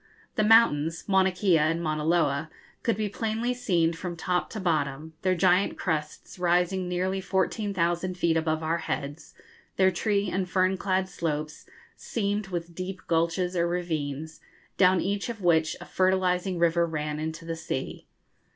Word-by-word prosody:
The -, -, +2 dB
mountains, 165 Hz, -8 st, +4 dB
Mauna 190 Hz, -1 st, +4 dB
Kea 180 Hz, -3 st, +3 dB
and 155 Hz, +2 st, +1 dB
Mauna 155 Hz, -2 st, -2 dB
Loa, 155 Hz, -2 st, +1 dB, 0.3 s
could 230 Hz, -3 st, 0 dB
be 215 Hz, -1 st, 0 dB
plainly 225 Hz, +4 st, -1 dB
seen 175 Hz, -10 st, +1 dB
from 170 Hz, +1 st, -6 dB
top 180 Hz, +1 st, -1 dB
to 215 Hz, -, -6 dB
bottom, 155 Hz, -3 st, -1 dB
their 185 Hz, -1 st, +2 dB
giant 180 Hz, +3 st, +3 dB
crests 155 Hz, +1 st, -3 dB
rising 180 Hz, +1 st, +1 dB
nearly 185 Hz, +2 st, -1 dB
14,000 185 Hz, -2 st, -1 dB
feet 170 Hz, -2 st, +2 dB
above 160 Hz, 0 st, 0 dB
our 165 Hz, +2 st, 0 dB
heads, 145 Hz, -1 st, -5 dB, 0.4 s
their 190 Hz, 0 st, +4 dB
tree 200 Hz, +2 st, 0 dB
and 185 Hz, -1 st, -2 dB
fern 185 Hz, +1 st, +2 dB
clad 190 Hz, 0 st, 0 dB
slopes 155 Hz, -4 st, -4 dB, 0.3 s
seamed 205 Hz, -2 st, -2 dB
with 175 Hz, -2 st, -5 dB
deep 185 Hz, +2 st, -5 dB
gulches 170 Hz, +2 st, 0 dB
or 170 Hz, -1 st, +2 dB
ravines, 160 Hz, -3 st, -3 dB, 0.4 s
down 185 Hz, -1 st, +4 dB
each 200 Hz, +4 st, -2 dB
of 220 Hz, -4 st, -6 dB
which 160 Hz, -2 st, +3 dB
a -, -, -9 dB
fertilising 185 Hz, 0 st, +1 dB
river 170 Hz, 0 st, +3 dB
ran 150 Hz, -1 st, -3 dB
into 160 Hz, +2 st, -5 dB
the 165 Hz, 0 st, -3 dB
sea. 160 Hz, -4 st, -5 dB
175 Hz, 155 wpm, -27 LUFS, 160-190 Hz, 0.4 s, mountains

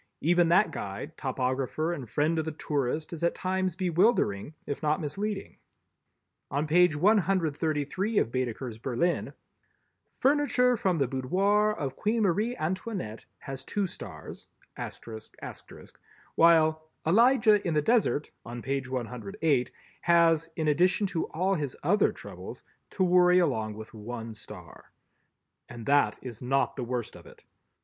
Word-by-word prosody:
Even 175 Hz, +1 st, +3 dB
that 180 Hz, +5 st, +4 dB
guide, 100 Hz, +11 st, -6 dB
topographer 130 Hz, +4 st, -1 dB
and 135 Hz, -9 st, -7 dB
friend 155 Hz, +5 st, +1 dB
of 160 Hz, -, -2 dB
the 160 Hz, -, -2 dB
tourist 150 Hz, +1 st, -2 dB
is 170 Hz, 0 st, -6 dB
at 170 Hz, -, +2 dB
times 185 Hz, -1 st, -1 dB
bewildering, 175 Hz, -, +1 dB
if 145 Hz, -, -4 dB
not 155 Hz, 0 st, +1 dB
misleading. 195 Hz, +6 st, -4 dB, 0.9 s
On 145 Hz, +2 st, -1 dB
page 175 Hz, 0 st, +4 dB
133 175 Hz, 0 st, +1 dB
of 115 Hz, -, +2 dB
Baedeker's 125 Hz, -2 st, -3 dB
Berlin, 135 Hz, +9 st, -1 dB, 0.9 s
"Furniture 265 Hz, -3 st, +3 dB
From 185 Hz, -5 st, 0 dB
the 140 Hz, -3 st, +1 dB
Boudoir 195 Hz, +12 st, +2 dB
of 135 Hz, -9 st, -4 dB
Queen 220 Hz, +1 st, 0 dB
Marie 210 Hz, +6 st, +1 dB
Antoinette" 180 Hz, -, -4 dB
has 135 Hz, -1 st, -7 dB
two 200 Hz, +7 st, -1 dB
stars, 85 Hz, -, -9 dB, 1.9 s
while 160 Hz, -1 st, +4 dB, 0.2 s
"Elijah 220 Hz, +2 st, +4 dB
in 165 Hz, -, 0 dB
the 150 Hz, -, +3 dB
Desert," 215 Hz, -8 st, +1 dB
on 120 Hz, 0 st, -7 dB
page 135 Hz, -1 st, -2 dB
108, 125 Hz, +2 st, -1 dB, 0.3 s
has, 165 Hz, -2 st, +4 dB
in 160 Hz, -2 st, -1 dB
addition 180 Hz, +7 st, +3 dB
to 175 Hz, -4 st, -1 dB
all 185 Hz, +4 st, 0 dB
his 145 Hz, -7 st, -3 dB
other 205 Hz, +8 st, +3 dB
troubles, -, -, -10 dB, 0.3 s
to 190 Hz, -, -1 dB
worry 180 Hz, 0 st, +5 dB
along 110 Hz, -11 st, +1 dB
with 110 Hz, +2 st, -10 dB
one 115 Hz, +1 st, -7 dB
star. 100 Hz, -5 st, -12 dB, 0.8 s
And 120 Hz, -2 st, -9 dB
that 140 Hz, -7 st, +3 dB
is 120 Hz, -4 st, -7 dB
not 135 Hz, +2 st, +1 dB
the 130 Hz, -, -4 dB
worst 120 Hz, -2 st, -4 dB
of -, -, -13 dB
it. -, -, -17 dB
155 Hz, 135 wpm, -28 LUFS, 130-185 Hz, 1.9 s, worry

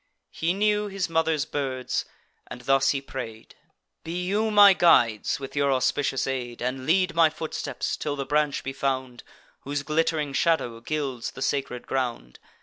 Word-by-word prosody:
He 165 Hz, +2 st, -1 dB
knew 210 Hz, +1 st, +1 dB
his 195 Hz, -3 st, -3 dB
mother's 160 Hz, -2 st, +1 dB
birds; 130 Hz, -3 st, -2 dB, 0.4 s
and -, -, -9 dB
thus 135 Hz, +1 st, +3 dB
he 140 Hz, 0 st, 0 dB
pray'd: 115 Hz, -5 st, -8 dB, 0.5 s
"Be 175 Hz, +2 st, -4 dB
you 210 Hz, +4 st, +1 dB
my 205 Hz, -2 st, +8 dB
guides, 120 Hz, -, +3 dB
with 135 Hz, 0 st, -8 dB
your 140 Hz, -1 st, +2 dB
auspicious 135 Hz, +1 st, +1 dB
aid, 125 Hz, -3 st, -4 dB
And 130 Hz, +1 st, -3 dB
lead 185 Hz, +2 st, +3 dB
my 165 Hz, -1 st, +5 dB
footsteps, 160 Hz, 0 st, -4 dB
till 145 Hz, -, -3 dB
the 140 Hz, -1 st, -4 dB
branch 150 Hz, +1 st, 0 dB
be 135 Hz, -, -4 dB
found, 130 Hz, -2 st, -2 dB, 0.4 s
Whose 145 Hz, +1 st, -4 dB
glitt'ring 155 Hz, -1 st, 0 dB
shadow 135 Hz, -6 st, +1 dB
gilds 135 Hz, -3 st, -3 dB
the 135 Hz, -, -6 dB
sacred 135 Hz, -3 st, -2 dB
ground. 120 Hz, -, -3 dB
140 Hz, 155 wpm, -25 LUFS, 130-165 Hz, 0.5 s, my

